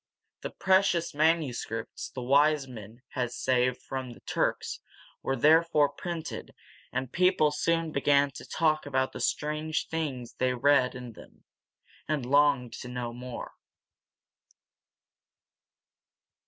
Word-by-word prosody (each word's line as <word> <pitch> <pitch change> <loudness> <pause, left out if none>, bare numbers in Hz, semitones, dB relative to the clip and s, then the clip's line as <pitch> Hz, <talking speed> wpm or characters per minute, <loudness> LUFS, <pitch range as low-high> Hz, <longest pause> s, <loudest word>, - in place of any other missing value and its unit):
The - - -4
precious 190 -3 +2
manuscripts 145 -7 -1
the 125 - -6
wise 145 +2 +3
men 115 0 -11
had 125 -2 -2
saved 125 0 0
from 130 -2 -5
the - - -16
Turks - - -1 0.4
were 135 - -1
therefore 155 +2 +4
printed, 165 +3 -6 0.4
and 130 0 -3
people 180 -4 +3
soon 165 +1 0
began 140 0 +3
to - - -10
talk 155 -2 +1
about 130 -1 0
the - - -8
strange 155 +1 -1
things 140 -7 -3
they 125 0 0
read 130 0 +3
in 125 -1 -7
them, - - -16 0.6
and 150 -5 -1
longed 140 -2 +3
to - - -7
know 125 -1 -4
more. 125 0 -7
140 Hz, 120 wpm, -28 LUFS, 125-155 Hz, 0.6 s, therefore